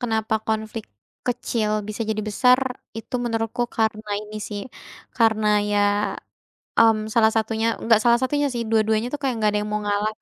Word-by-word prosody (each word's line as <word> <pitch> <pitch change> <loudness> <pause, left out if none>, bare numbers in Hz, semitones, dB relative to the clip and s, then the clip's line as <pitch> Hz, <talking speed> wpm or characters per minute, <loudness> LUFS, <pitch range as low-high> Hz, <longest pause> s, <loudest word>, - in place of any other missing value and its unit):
kenapa 220 -3 -1
konflik 220 0 -2 0.4
kecil 235 -3 -1 0.2
bisa 215 +2 -3
jadi 215 0 -1
besar, 250 +5 +4 0.4
itu 225 - -8
menurutku 225 0 -1
karena 220 -1 -1
ini 215 0 -9
sih, 205 -1 -5 0.6
karena 220 -2 +3 0.2
ya, 205 0 +2 1.0
mmm, 225 -1 +6 0.2
salah 220 -1 +4
satunya, 220 0 0 0.2
enggak 225 -1 +5
salah 235 0 +5
satunya 290 +3 +1
sih, 240 -1 -2
dua-duanya 220 +1 +2
tuh - - -1
kayak 265 -2 0
nggak 215 -1 +3
ada 210 - 0
yang 210 - -5
mau 210 - 0
ngalah, 205 +1 0
220 Hz, 165 wpm, -23 LUFS, 215-235 Hz, 1.0 s, mmm